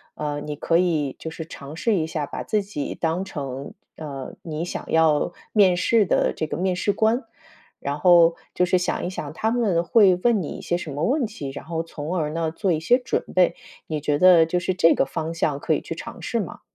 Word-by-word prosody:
呃， 145 -1 -3
你 150 -1 -4
可 165 +3 +1
以 155 -6 +1
就 160 - -5
是 160 0 -7
尝 145 -1 -10
试 225 +6 +1
一 160 -3 0
下， 155 -2 -3
把 - - -6
自 215 -2 0
己 150 -8 -5
当 170 +3 -1
成， 135 -5 -6 0.2
呃， 140 -4 -7
你 160 0 -4
想 175 - -5
要 160 +1 +3 0.2
面 195 -4 +5
试 215 +3 +3
的 - - +2
这 155 - -3
个 - - -4
面 185 +1 0
试 205 +2 +1
官， 225 +3 +1 0.6
然 145 +1 -3
后 170 -1 +6 0.2
就 180 - +2
是 180 +1 +2
想 180 - -1
一 - - -2
想 155 -5 -6
他 220 +6 -1
们 205 -9 +1
会 190 0 +5
问 235 -5 +3
你 150 - -5
一 - - -7
些 175 - -1
什 155 -5 -6
么 150 +3 -3
问 265 - +2
题， 180 -11 -6
然 140 - -9
后 165 0 -3
从 165 +2 -5
而 150 -2 0
呢 165 0 -1
做 185 +3 -1
一 155 - +1
些 240 +10 +4
准 250 - -1
备。 180 -1 +4 0.3
你 155 -2 -2
觉 145 0 0
得 175 -1 +7
就 180 +2 -1
是 180 +1 0
这 165 -2 +5
个 - - +2
方 160 +4 -4
向 150 -4 -1
可 - - 0
以 - - 0
去 - - -6
尝 - - -9
试 - - -1
吗？ - - -6
165 Hz, 250 characters per minute, -23 LUFS, 150-185 Hz, 0.6 s, 得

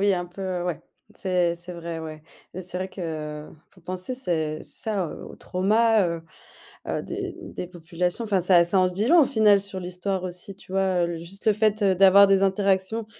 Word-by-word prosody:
Oui, 200 0 +3
un 175 0 -3
peu, 180 +3 -9
heu, 180 -2 -2
ouais. 175 -3 -3 0.3
C'est 180 -3 0
c'est 175 +1 -10
vrai, 170 -1 -6
ouais 155 -1 -8 0.3
et 185 - -6
c'est 180 0 -7
vrai 185 +1 -3
qu'il 185 - -7 0.7
faut 185 - -21
penser, 185 +8 -4
c'est 160 -10 -2
ça, 200 -5 -3
heu, - - -9
aux - - -10
aux - - -12
traumas, 215 +2 +2
heu 170 -1 -3 0.7
heu, - - -2
des - - -5
des 180 - -7
populations. 175 +4 -3
Enfin, 200 -4 +1
ça 175 -1 +5
ça 185 +2 +2
en 185 - +4
se 180 - -9
dit 210 +3 0
long 345 +3 +7
au - - +5
final 210 -4 +4
sur 195 -1 -4
l'histoire 180 +1 -3
aussi, 180 +2 -7
tu 190 - -16
vois? 190 -2 +1
Heu, 170 - -3
l 165 - -6
juste 180 +6 -10
le 215 - +5
fait, 215 0 +1
heu, 195 -1 +4
d'avoir 195 +1 +7
des 195 0 +4
interactions 195 +2 +1
185 Hz, 225 wpm, -25 LUFS, 175-200 Hz, 0.7 s, long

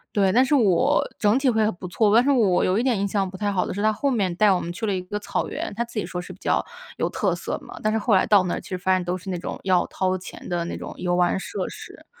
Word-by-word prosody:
对， 195 -2 +3
但 255 +6 +4
是 270 - 0
我 255 - +3
整 210 +4 +3
体 270 -2 +2
会 220 -2 +2
很 215 - 0
不 180 +1 -8
错， 210 +3 +2
但 235 - +6
是 280 - +1
我 210 -9 +3
有 185 +2 +2
一 235 - +1
点 245 -6 +1
印 200 - 0
象 195 -1 0
不 190 - -11
太 205 +1 -1
好 185 -2 0
的 - - -4
是 200 - -3
他 215 +1 +3
后 275 +6 -1
面 190 -7 0
带 210 +1 +4
我 185 - +2
们 170 - -5
去 220 +5 -4
了 205 - 0
一 185 - -2
个 185 +3 -5
草 - - -2
原， - - -4
他 235 - 0
自 235 -1 -10
己 - - -2
说 180 -1 -5
是 180 - -10
比 185 - -12
较 - - +1 0.3
有 - - 0
特 - - 0
色 - - -4
嘛， - - -10
但 215 - +1
是 220 - +1
后 220 +1 +1
来 190 - +5
到 205 -3 +5
那 180 - -2
儿 - - -3
其 - - -14
实 185 - -3
发 190 +1 0
现 185 -1 +1
都 175 +1 -2
是 185 +1 -7
那 180 - -3
种 - - -6
要 185 -2 +2
掏 185 0 -1
钱 180 - -10
的 175 -1 -1
那 - - -5
种 - - -7
游 175 -1 -1
玩 180 +1 +2
设 190 -1 -4
施。 - - -11
195 Hz, 350 characters per minute, -24 LUFS, 180-220 Hz, 0.3 s, 但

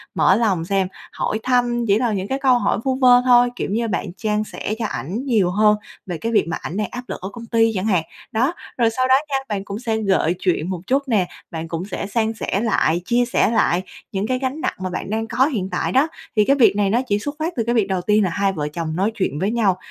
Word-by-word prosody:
mở 185 - +4
lòng 195 -7 +1
xem, 190 0 +1 0.2
hỏi 215 - -2
thăm 245 -2 +1
chỉ 200 - +4
là 235 -3 +1
những 190 -1 -2
cái 270 +4 -2
câu 255 -3 +4
hỏi - - +1
vu 265 -1 0
vơ 250 -2 +6
thôi, 245 -1 +6
kiểu - - -3
như, 230 +2 0
bạn 210 - -2
chan 210 -1 0
sẻ 215 - -5
cho - - -1
ảnh 205 - -4
nhiều 215 -9 +2
hơn 210 +2 +4 0.3
về 175 -3 -4
cái 230 +7 -3
việc 215 - +2
mà 165 - -2
ảnh 180 - -5
đang 210 -2 0
áp 250 0 -6
lực - - -5
ở 190 - -4
công 235 +1 -9
ty 225 0 +3
chẳng 185 +1 -1
hạn. 185 -7 +2 0.3
Đó, 255 +9 +1 0.2
rồi 235 -2 +3
sau 255 +3 0
đó 260 - +6
nha, 275 - -1
bạn 200 -2 -2
cũng 200 +1 -5
sẽ 225 -2 -1
gợi 190 -5 +1
chuyện 180 -2 0
một 180 -3 -4
chút 275 +2 +1
nè, 205 -7 +2 0.2
bạn 165 0 -5
cũng 165 +2 -4
sẽ 200 - -5
san 220 +2 0
sẻ 205 -2 -2
lại, 175 -7 +1
chia 245 +3 +2
sẻ 240 - +2
lại 180 -5 +2 0.3
những 195 +2 -2
cái 255 +1 0
gánh 270 +4 -3
nặng 365 - 0
mà 185 0 -3
bạn 180 - -5
đang 225 +1 -2
có 260 +3 +2
hiện 215 -11 -2
tại - - -1
đó. 270 +4 +3 0.3
Thì 210 - +5
cái 275 - +4
việc 250 -7 +5
này 205 -1 +2
nó 235 +5 +2
chỉ 205 -2 +1
xuất 290 +7 -5
phát 325 +3 -2
từ 230 - 0
cái 235 +2 0
việc 215 -4 +2
đầu 190 -2 -1
tiên 210 +3 +3
là 185 - +1
hai 195 +3 0
vợ 150 -4 -3
chồng 155 +1 -4
nói 195 +5 +1
chuyện 170 -8 -1
với 195 +5 0
nhau 210 -6 +2
215 Hz, 270 wpm, -21 LUFS, 190-245 Hz, 0.3 s, vơ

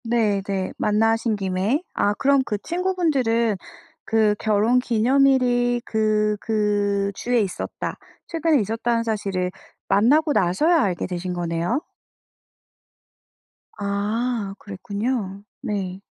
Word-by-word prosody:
네네. 200 -5 0
만나신 225 +1 +2
김에. 195 - -1
아 205 - +1
그럼 280 +2 +3
그 210 -5 -2
친구분들은 300 - +1 0.5
그 215 -2 +2
결혼기념일이 245 +3 +2
그 215 -1 +1
그 205 -2 0
주에 245 +4 0
있었다, 195 -3 -4 0.3
최근에 325 -3 +2
있었다는 230 +2 0
사실을 195 -5 -2 0.4
만나고 290 +9 +3
나서야 300 - +3
알게 180 -4 -1
되신 180 0 -4
거네요. 170 - -1 2.0
아 205 +1 -2
그랬군요. 200 0 -4 0.2
네. 190 -2 -3
215 Hz, 220 characters per minute, -23 LUFS, 200-245 Hz, 2.0 s, 그럼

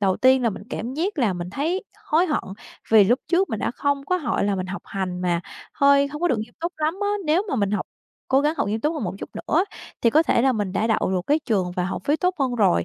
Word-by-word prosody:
đầu 190 -2 +2
tiên 260 0 +4
là 230 - +2
mình 195 - -8
cảm 240 +4 -4
giác 345 +3 -2
là 220 -7 +2
mình 175 0 -5
thấy 330 - -2 0.2
hối 335 +4 +3
hận 300 - -1 0.5
vì 215 -3 +7
lúc 245 +7 +3
trước 360 +3 +2
mình 220 - -2
đã - - -1
không 280 +2 -1
có 365 +4 +1
hội 250 - -1
là 200 -1 +1
mình 185 -1 -3
học 195 +2 -6
hành 185 -2 -4
mà 175 -2 0 0.3
hơi 280 0 +5
hông 295 +2 -7
có 350 - +3
được 245 - +1
nghiêm 225 +2 -6
túc 340 +2 -2
lắm 310 +2 0
á, 405 - +1 0.2
nếu 320 +5 +3
mà - - -1
mình 200 -3 +1
học 210 - -1 0.4
cố 265 +1 +4
gắng 300 +3 +1
học - - 0
nghiêm 220 +2 -1
túc 305 +5 0
hơn 290 - -3
một 180 - -3
chút - - -7
nữa 335 +5 +1 0.4
thì 230 - +4
có 315 +5 +5
thể 250 -5 +2
là 265 - +4
mình 205 -5 -2
đã 210 +3 0
đậu 220 -4 +1
được 185 -1 +1
cái 295 +2 +3
trường 195 - -1
và 180 - 0
học 185 - -4
phí 295 +2 +2
tốt 360 +1 0
hơn 260 -3 0
rồi. 85 - +3
255 Hz, 285 wpm, -23 LUFS, 200-305 Hz, 0.5 s, vì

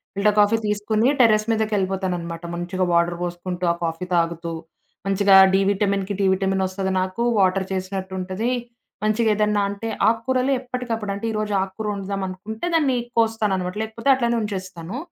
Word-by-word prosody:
Filter 205 +1 +2
coffee 210 +2 +4
తీసుకొని 210 +2 +1
terrace 215 -3 +5
మీదకెళ్ళిపోతాననమాట. 190 -6 -1
మంచిగా 175 +2 -2
water 170 0 +2
బోసుకుంటూ, 175 +1 -3
ఆ - - -7
కాఫీ 165 +2 -2
తాగుతూ, 170 0 0 0.5
మంచిగా 195 0 +4 0.2
డీ 195 - +4
విటమిన్‌కి 200 0 0
డీ 200 - +2
విటమిన్‌ 190 0 0
ఒస్తది 190 0 -3
నాకు, 185 +5 -2 0.2
వాటర్ 190 0 +2
చేసినట్టు 190 0 -4
ఉంటది. 190 +6 -2 0.5
మంచిగేదన్నా 215 -1 +2
అంటే 200 +3 -5 0.2
ఆక్కూరలు 255 +4 0
ఎప్పటికప్పుడు 245 -4 -4
అంటే, 200 - -5
ఈరోజు 215 -1 -2
ఆకుకూర 195 +3 -4
ఒండుదామనుకుంటే 195 - -5
దాన్ని 280 -6 +2 0.2
కోస్తాననమాట, 215 -5 +1
లేకపోతే 225 +4 -3
అట్లనే 235 -2 0
ఉంచేస్తాను. 190 -1 -5
200 Hz, 135 wpm, -22 LUFS, 185-220 Hz, 0.5 s, terrace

